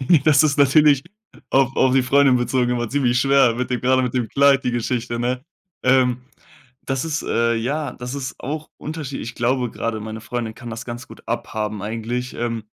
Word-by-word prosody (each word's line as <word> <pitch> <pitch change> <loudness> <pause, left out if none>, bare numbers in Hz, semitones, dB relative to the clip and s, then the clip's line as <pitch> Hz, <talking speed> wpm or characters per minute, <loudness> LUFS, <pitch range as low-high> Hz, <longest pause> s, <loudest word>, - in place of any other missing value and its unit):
D 155 +3 +4
Das 155 -1 +6
ist 150 -1 +1
natürlich 140 0 +5 0.5
auf 135 0 +3
auf 130 0 +3
die 135 - +4
Freundin 135 0 +4
bezogen 125 0 0
immer 120 -2 -1
ziemlich 125 -2 +1
schwer 135 -3 +4
mit 125 +2 -3
dem 125 - -1
gerade 130 0 +3
mit 125 0 -2
dem 120 -3 0
Kleid, 140 -1 +4
die 125 - +1
Geschichte, 120 0 -2
ne? 125 +2 -1 0.4
Ähm, 125 -1 +3 0.7
das 135 0 -1
ist, 160 -1 -2
äh 115 0 +1
ja, 135 +5 -2
das 125 +2 -7
ist 135 -1 -5
auch 150 +4 -5
unterschie 150 -3 -5
ich 115 - -6
glaube 125 0 0
gerade, 115 -1 -3
meine 110 +1 -6
Freundin 115 -1 -4
kann 120 -1 -9
das 115 - -6
ganz 120 +1 -7
gut - - -13
abhaben 105 -2 -3
eigentlich, 115 +4 -4
ähm, 115 -2 -3
125 Hz, 195 wpm, -21 LUFS, 120-135 Hz, 0.7 s, Das